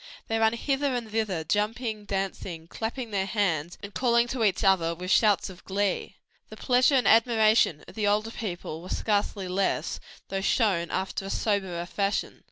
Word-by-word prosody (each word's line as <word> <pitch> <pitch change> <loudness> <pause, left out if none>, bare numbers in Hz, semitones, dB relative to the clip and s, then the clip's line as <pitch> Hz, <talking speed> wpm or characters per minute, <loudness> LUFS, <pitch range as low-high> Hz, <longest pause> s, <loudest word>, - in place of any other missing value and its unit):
They 225 0 0
ran 220 0 +3
hither 270 +2 0
and 230 -3 -4
thither 210 -7 -1
jumping, 215 +4 -1
dancing, 190 -4 -4
clapping 225 +5 -5
their 195 -1 0
hands 175 -6 -1
and 200 0 -8
calling 235 -1 +2
to 245 -3 -1
each 210 +1 +2
other 175 -4 +3
with 180 +2 -4
shouts 210 +1 +4
of 185 -2 -11
glee. 195 0 -1 0.3
The - - -10
pleasure 255 +2 +3
and 255 - +3
admiration 220 -7 +4
of - - -12
the 210 -2 -1
older 210 +2 +1
people 175 -7 -5
were 180 - -10
scarcely 205 -2 -1
less, 190 +2 -1 0.3
though 195 0 -2
shown 195 -5 +1
after 190 +1 -3
a - - -5
soberer 190 -5 -1
fashion. 200 +3 -2
205 Hz, 175 wpm, -27 LUFS, 185-225 Hz, 0.3 s, shouts